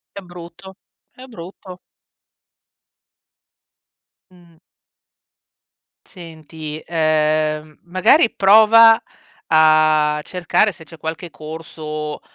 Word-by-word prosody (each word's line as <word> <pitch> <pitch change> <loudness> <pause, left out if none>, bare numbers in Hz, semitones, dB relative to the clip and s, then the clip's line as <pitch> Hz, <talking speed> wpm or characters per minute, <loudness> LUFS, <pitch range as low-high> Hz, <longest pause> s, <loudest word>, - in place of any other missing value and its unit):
È - - -7
brutto, 175 +1 -13 0.4
è 255 - -15
brutto. 185 -5 -12 2.5
Mh. 175 -2 -23 1.5
Senti, 160 -3 -11
ehm, 155 -1 -1
magari 185 - +2
prova 220 +3 +5 0.5
a 155 -1 +3
cercare 185 +5 -1
se 165 -3 -16
c'è 165 +1 -15
qualche 160 +2 -7
corso, 155 -1 -8
165 Hz, 75 wpm, -18 LUFS, 155-185 Hz, 2.5 s, prova